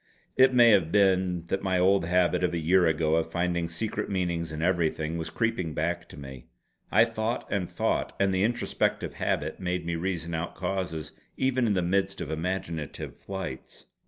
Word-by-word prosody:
It 130 0 +6
may 120 -2 +7
have 90 -6 +3
been 95 -4 +2
that 95 - 0
my 95 -1 +1
old 95 0 +3
habit 90 +1 +2
of 90 -1 +1
a - - 0
year 90 +2 +4
ago 80 0 +2
of 80 - -1
finding 85 -1 -1
secret 100 +6 -3
meanings 85 -4 -1
in 80 +1 -4
everything 85 -3 0
was 80 - -4
creeping 90 -9 -1
back 85 +3 -2
to - - -12
me. 65 -3 -10 0.4
I 115 +3 +6
thought 115 +1 -2
and 95 -3 -1
thought; - - -1
and 100 -1 +2
the 95 - +1
introspective 120 +4 0
habit - - -2
made 90 -1 -2
me 85 0 -1
reason 85 -1 -3
out 80 +2 -3
causes 90 -4 -3 0.3
even 130 -2 +1
in 105 - +2
the 90 - +1
midst 95 +2 0
of 75 - -4
imaginative 85 -2 -4
flights. 95 -10 -7
90 Hz, 185 wpm, -27 LUFS, 85-95 Hz, 0.4 s, may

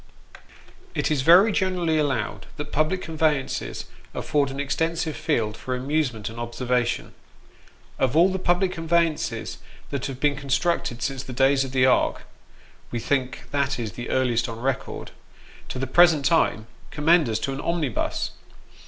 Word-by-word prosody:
IT - - 0
is 145 -3 +2
very 180 +9 +7
generally 180 -5 +1
allowed 135 -8 -1
that 150 0 -6
public 155 +5 0
conveyances 155 -4 -1 0.3
afford 145 -2 0
an 135 +1 -6
extensive 160 +2 -1
field 105 -2 0
for 130 +2 -4
amusement 125 -5 -1
and 115 +1 -6
observation. 120 0 -1 0.9
Of 130 +1 +1
all 175 +3 +6
the 190 - -2
public 180 +1 +2
conveyances 165 -8 0 0.3
that 140 -2 -2
have 135 -2 -6
been 145 +1 +2
constructed 140 -2 -1
since 135 -1 -2
the 130 - -8
days 135 +2 +3
of 135 - -6
the 130 -1 +3
Ark 130 - +2 0.7
wo 120 - -2
think 130 +2 -1
that 140 -1 0
is 115 -4 -4
the 120 +6 -7
earliest 120 -3 +1
on 115 0 -6
record 130 +2 -3 0.6
to - - -5
the 130 - -1
present 160 +1 +5
time, 140 -7 +2 0.2
commend 155 -1 +3
us 110 - 0
to 135 - -2
an 135 - -4
omnibus. 160 -9 -1
140 Hz, 155 wpm, -24 LUFS, 125-160 Hz, 0.9 s, very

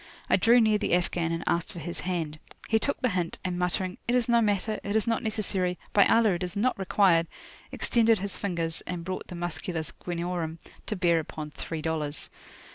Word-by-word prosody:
I - - +7
drew 240 +1 +5
near 215 -2 +4
the 205 - +2
Afghan, 175 -1 0
and 165 0 -2
asked 170 0 0
for - - -10
his 170 +1 -5
hand. 165 -4 -3 0.3
He 220 - +3
took 280 - 0
the 255 - +2
hint, 180 -4 -2
and 180 -1 -1
muttering, 180 +1 -1
"It 240 - +2
is 245 -2 +2
no 235 -1 +4
matter!" 215 0 0
"It 205 +1 -2
is 220 - +3
not 230 -1 +1
necessary!" 195 -5 -1 0.2
"By 200 - +6
Allah 225 -2 +4
it 175 - -2
is 180 +3 -4
not 245 +1 +1
required!" 185 -3 +3 0.4
extended 230 -1 +3
his 200 +1 -3
fingers, 170 -4 -2
and 175 -2 -4
brought 185 0 -4
the 180 - -7
"musculus 170 -1 -2
guineorum" 170 -2 -3 0.3
to 215 - -2
bear 170 -3 +3
upon 155 -1 -6
three 160 0 -5
dollars. 155 -2 -2
180 Hz, 200 wpm, -28 LUFS, 170-215 Hz, 0.4 s, I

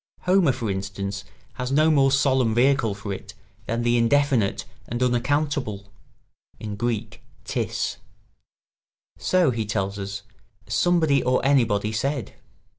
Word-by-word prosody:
Homer, 180 -5 +3
for 115 -4 -3
instance, 100 +1 -4 0.3
has 125 0 -4
no 155 +3 +4
more 135 -3 +4
solemn 130 -4 +2
vehicle 120 -4 +3
for 100 -1 -5
it 100 +2 -9 0.3
than 115 +1 -1
the 120 0 +3
indefinite 125 -3 +2 0.2
and 120 +2 -2
unaccountable 125 -5 -1 0.8
[Greek: 115 -1 -3 0.2
tis]. - - -2 1.2
"So," 165 - +3
he 115 -2 -2
tells 100 -1 -2
us, 100 0 -5 0.4
"somebody 160 -6 +2
or 125 +1 +2
anybody 115 -7 +2
said." 125 +1 -2
120 Hz, 115 wpm, -24 LUFS, 105-140 Hz, 1.2 s, no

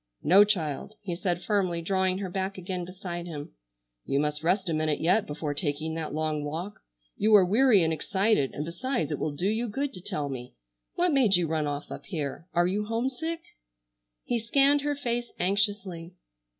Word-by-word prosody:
"No, 190 +7 +7
child," 185 -2 -1
he 185 -5 -4
said 175 -1 -2
firmly 190 -5 +1
drawing 185 +2 +1
her 195 -1 -4
back 190 +1 -2
again 185 -1 -4
beside 175 -1 -6
him, 150 -4 -7 0.5
"you 140 - 0
must 150 0 -1
rest 185 +3 +1
a 165 - 0
minute 155 -1 0
yet 190 +6 +2
before 150 0 -3
taking 155 0 -1
that 160 -1 -4
long 155 -1 -1
walk. 170 +7 -5 0.4
You 215 +1 +5
are 195 -3 +7
weary 215 0 +5
and 160 0 +1
excited, 190 -2 +1
and 150 - -4
besides 175 - -2
it 150 - -2
will 150 -2 -2
do 175 - -2
you 225 +3 0
good 275 +6 -2
to 180 - -8
tell 175 -7 -2
me. 125 - -7 0.4
What 350 -2 +2
made 240 -8 +5
you 175 -1 +2
run 155 -1 -1
off 145 0 -4
up - - -8
here? 160 -1 -4
Are 175 0 +3
you 200 +4 0
homesick?" 265 +9 -2 0.8
He 240 - -1
scanned 275 +5 +4
her 290 0 -1
face 240 -3 -2
anxiously. 190 -3 0
185 Hz, 190 wpm, -28 LUFS, 160-210 Hz, 0.8 s, No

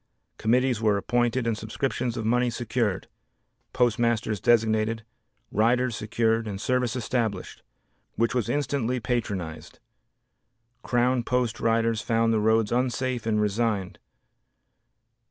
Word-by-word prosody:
Committees 125 0 +2
were 105 -2 +3
appointed 120 +3 0
and 115 -1 +1
subscriptions 120 +2 -3
of 110 - -3
money 125 +2 +2
secured, 115 -4 -2 0.6
postmasters 115 -2 +1
designated, 110 -1 +2 0.5
riders 120 +3 +2
secured 110 +1 0
and 100 -2 -5
service 125 +1 0
established, 115 -3 -2 0.5
which 115 0 +1
was 125 -5 -1
instantly 135 -4 -1
patronized. 95 -10 -4 1.0
Crown 125 +1 +1
post 125 -1 -1
riders 115 -1 +1
found 115 +1 +1
the 110 - +2
roads 110 0 +2
unsafe 125 -1 -1
and 105 -1 +1
resigned. 105 -2 -1
115 Hz, 110 wpm, -26 LUFS, 110-125 Hz, 1.0 s, were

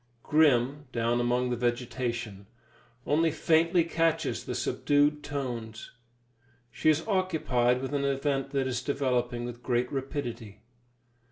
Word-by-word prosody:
Grim, 145 -2 +3
down 120 0 0
among 125 +1 +1
the - - +1
vegetation, 120 -4 -3 0.6
only 160 +3 +3
faintly 165 +2 +3
catches 165 -1 0
the - - -4
subdued 145 +1 +1
tones; 120 -6 -5 0.8
she 155 - +1
is 155 +4 +1
occupied 145 - +1
with 135 - -4
an 140 -1 0
event 135 0 0
that 135 -1 0
is 130 -1 -2
developing 125 -3 -1
with 120 0 -7
great 125 0 0
rapidity. 120 -6 -5
130 Hz, 120 wpm, -28 LUFS, 120-145 Hz, 0.8 s, Grim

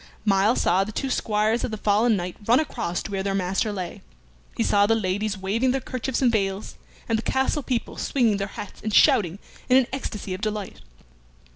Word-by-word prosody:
Myles 200 +3 +3
saw 185 +3 +3
the 210 - -6
two 265 +4 -3
squires 215 0 +1
of - - -1
the 215 - -4
fallen 215 +3 +3
knight 180 -2 -4
run 240 +3 +5
across 235 - -2
to - - -7
where 195 -1 -1
their 195 0 -1
master 195 +3 0
lay, 185 -4 -5 0.6
he - - +2
saw 205 0 +3
the 225 - +3
ladies 205 0 -1
waving 210 +7 0
their 265 +2 +1
kerchiefs 255 +1 -3
and 245 - +5
veils, 195 -2 -1 0.3
and 225 -1 +1
the - - -2
castle 265 +4 0
people 250 -3 -3
swinging 230 -7 +1
their 200 0 -2
hats 205 -1 -9
and 215 -1 -2
shouting 180 -3 +4 0.3
in 255 - +6
an 265 - +4
ecstasy 210 -7 -4
of 185 - -6
delight. 210 -3 -4
210 Hz, 200 wpm, -24 LUFS, 195-235 Hz, 0.6 s, in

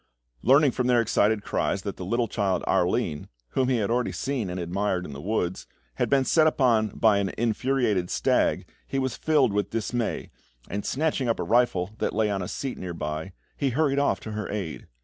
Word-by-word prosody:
Learning 140 +2 +5
from 125 +1 -1
their 125 -1 +4
excited 110 -2 +2
cries 95 - -1
that 100 - -4
the - - -7
little 115 +5 0
child, 95 -4 0
Arline 90 -4 0 0.2
whom 130 - +1
he 130 - +2
had 110 0 0
already 120 0 +1
seen 130 -8 -2
and 90 +1 -4
admired 90 +1 -1
in 75 - -8
the 70 - -8
woods 90 - -2 0.3
had - - 0
been 135 -1 +3
set 155 +2 +4
upon 120 -8 +3
by 105 0 +3
an 100 -1 0
infuriated 115 -5 +1
stag, - - +1 0.2
he 135 - -3
was 130 -2 -1
filled 145 -8 +2
with 100 -1 0
dismay, 115 +2 -2 0.4
and 100 0 -4
snatching 145 -3 0
up 115 - 0
a - - 0
rifle 110 -6 +2
that - - -1
lay 110 -1 +2
on 100 -1 -1
a 90 - -4
seat 135 -2 -4
near 90 -2 -5
by, 80 +4 -4 0.2
he 140 - 0
hurried 140 +1 +1
off 140 - +1
to 110 - -7
her 105 -1 -4
aid. 95 -7 -5
110 Hz, 205 wpm, -26 LUFS, 95-130 Hz, 0.4 s, Learning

